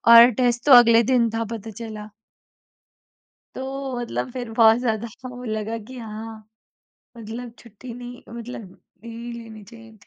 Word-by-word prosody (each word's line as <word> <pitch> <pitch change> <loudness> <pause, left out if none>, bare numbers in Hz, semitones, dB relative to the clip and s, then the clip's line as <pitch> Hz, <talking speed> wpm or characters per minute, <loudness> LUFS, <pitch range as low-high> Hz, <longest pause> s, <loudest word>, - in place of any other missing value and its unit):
और 235 +1 +10
टेस्ट 240 0 +1
तो 290 - +4
अगले 235 -1 +8
दिन 235 -2 +3
था 225 +1 -2
पता 225 0 -7
चला। 215 -1 -8 1.5
तो 265 -1 -4
मतलब 240 +1 -3
फिर 245 -2 -6
बहुत 225 -1 +6
ज़्यादा 230 -2 -1 0.2
वो 250 0 -9
लगा 220 -1 -3
कि 260 - -10
हाँ, 220 -1 -8 0.7
मतलब 230 +2 -7
छुट्टी 235 +2 -11
नहीं 245 0 -9
मतलब 235 -3 -8 0.4
ले 230 - -8 0.2
लेनी 225 -2 -10
चाहिए 225 +2 -14
थी। 200 - -24
230 Hz, 150 wpm, -23 LUFS, 220-245 Hz, 1.5 s, और